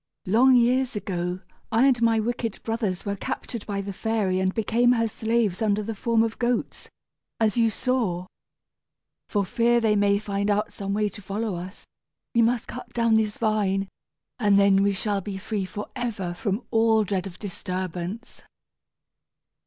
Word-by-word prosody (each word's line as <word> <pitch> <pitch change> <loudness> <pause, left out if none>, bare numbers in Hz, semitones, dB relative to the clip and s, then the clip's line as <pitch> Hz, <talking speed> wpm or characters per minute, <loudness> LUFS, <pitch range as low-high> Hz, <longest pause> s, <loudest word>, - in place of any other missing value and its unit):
"Long 250 +7 +5
years 250 +1 +3
ago 180 -2 -3 0.3
I 230 +3 +4
and 255 -3 +3
my 230 -1 +4
wicked 230 -1 -3
brothers 225 -5 -2
were 200 0 -1
captured 220 +2 -5
by 200 -1 -2
the 200 0 -5
fairy 205 -3 0
and 190 0 +1
became 235 +4 +2
her 230 -2 +1
slaves 220 -3 0
under 210 -1 +1
the 225 +2 -4
form 225 +2 +2
of 225 -1 -3
goats, 240 0 -1 0.5
as 220 -2 +2
you 230 -2 +3
saw. 220 -7 -1 1.0
For 205 -2 +1
fear 235 +5 +2
that 225 - +1
they 210 - +3
may 200 0 +3
find 200 0 -2
out 205 +1 0
some 200 0 -3
way 210 0 +1
to 205 - -11
follow 205 +2 -3
us, 180 +2 -8 0.5
we 235 - +4
must 230 0 +1
cut 250 - -8
down 230 -1 +3
this 215 -1 +1
vine, 200 -3 0 0.5
and 205 -3 +4
then 200 -1 +5
we 200 0 +3
shall 200 +1 -1
be 195 0 -5
free 200 0 -3
forever 210 -2 -4
from 200 +6 -2
all 225 -1 +4
dread 195 -1 -2
of 180 -1 -10
disturbance." 185 +2 -5
210 Hz, 170 wpm, -25 LUFS, 195-230 Hz, 1.0 s, Long